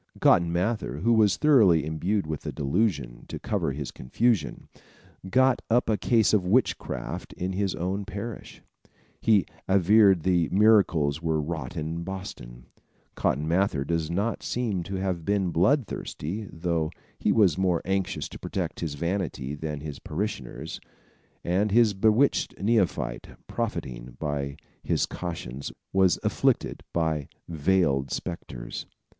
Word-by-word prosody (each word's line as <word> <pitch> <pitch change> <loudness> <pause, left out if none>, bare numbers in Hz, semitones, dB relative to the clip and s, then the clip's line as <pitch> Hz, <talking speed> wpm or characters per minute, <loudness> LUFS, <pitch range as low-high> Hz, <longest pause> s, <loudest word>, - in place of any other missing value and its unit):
Cotton 85 -1 +4
Mather, 90 -4 -1
who 115 +4 +3
was 105 -5 +4
thoroughly 105 - +5
imbued 85 +5 -1
with 75 -1 -4
the - - -4
delusion, 70 - -1
to - - -5
cover - - -1
his 70 0 -5
confusion, 110 - 0 0.6
got 130 +3 +3
up 120 0 +3
a - - +3
case 110 -1 +3
of 105 -4 +4
witchcraft 110 +9 -1
in 95 +1 -3
his 100 0 -1
own 95 +3 -2
parish. 110 +3 -7 0.6
He 105 -4 +4 0.2
averred 95 0 +5
that 90 -3 +2
miracles 90 -8 +4
were 80 -2 0
wrought 85 +4 -4
in 80 +2 -3
Boston. 75 -11 -8 0.5
Cotton 75 +4 0
Mather 85 -4 +1
does 80 +1 -1
not 100 +7 -1
seem 115 -7 -1
to 95 - -4
have 95 -3 -2
been 100 -1 +1
bloodthirsty, 100 - 0
though 80 -2 -1 0.3
he - - +2
was 100 -8 +4
more 90 -2 +1
anxious 95 0 -1
to - - -10
protect - - -3
his 80 -4 -3
vanity 85 -4 -2
than 75 -1 -4
his 75 -2 -6
parishioners, 75 - -4 0.6
and 95 +5 +1
his 110 0 +4
bewitched 110 +7 +2
neophyte, 100 - 0 0.2
profiting - - -4
by 70 -2 -3 0.2
his - - +1
cautions, 70 -7 -6 0.2
was 95 -2 +4
afflicted - - +1
by 80 -4 0 0.2
veiled 80 -4 +1
spectres. - - -5
90 Hz, 135 wpm, -27 LUFS, 75-100 Hz, 0.6 s, thoroughly